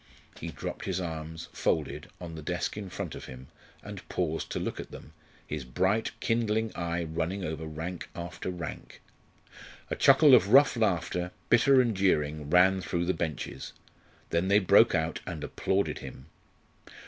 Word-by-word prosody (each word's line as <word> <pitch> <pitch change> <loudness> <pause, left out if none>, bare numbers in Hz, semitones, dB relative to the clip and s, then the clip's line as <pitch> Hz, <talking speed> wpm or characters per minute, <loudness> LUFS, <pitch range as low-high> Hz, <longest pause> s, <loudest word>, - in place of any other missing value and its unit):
He - - -5
dropped - - -6
his 95 -1 -1
arms, 80 -1 -5
folded, 75 -1 -1
on 85 -2 -7
the 80 - -7
desk 90 +3 -2
in 100 -2 -6
front - - -5
of - - -8
him, 65 +1 -11 0.3
and - - -9
paused 80 -3 -2
to - - -3
look - - -4
at - - -7
them, 75 - -12 0.3
his - - -4
bright 95 - 0
kindling 110 -1 0
eye 85 0 -2
running 85 +4 -3
over 80 0 -4
rank 80 +3 -6
after 85 +1 -5
rank. 90 -2 -7 0.9
A - - +1
chuckle 140 +1 +6
of 110 -7 +7
rough 140 +5 +6
laughter, 90 -5 0 0.2
bitter 130 +3 +6
and 120 -4 +2
jeering, 75 -6 +1
ran 95 +3 +5
through 85 -1 -1
the 95 - +1
benches. 80 -5 -4 0.6
Then 85 +3 +1
they 100 +1 +5
broke 95 -3 +5
out 80 0 -1
and - - -5
applauded 95 +1 -1
him. 65 - -10
90 Hz, 160 wpm, -29 LUFS, 80-100 Hz, 0.9 s, of